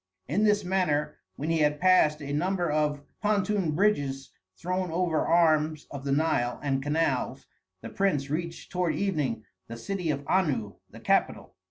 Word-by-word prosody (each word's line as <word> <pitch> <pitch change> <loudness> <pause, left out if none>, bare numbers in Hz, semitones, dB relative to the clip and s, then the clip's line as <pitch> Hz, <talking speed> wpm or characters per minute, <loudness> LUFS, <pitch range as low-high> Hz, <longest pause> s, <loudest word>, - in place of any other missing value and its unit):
In 185 +10 +1
this 210 -2 +2
manner 150 -5 0 0.2
when 155 +4 -3
he 165 - +1
had 150 -1 +2
passed 160 -4 +4
a 140 0 -4
number 175 +1 0
of 150 -1 0 0.2
pontoon 205 -5 +1
bridges 140 -9 0 0.3
thrown 185 +1 -2
over 165 -1 0
arms 155 -2 +2
of 140 -1 -7
the 140 - -1
Nile 135 -5 +1
and 135 -2 0
canals, 145 -2 -1 0.4
the - - -7
prince 170 -9 0
reached 165 +3 -4
toward 180 -2 0
evening 150 - -1 0.2
the 115 - -7
city 180 +7 -3
of 140 -1 -2
Anu, 140 - +1 0.2
the - - -12
capital. - - 0
155 Hz, 160 wpm, -27 LUFS, 145-185 Hz, 0.4 s, passed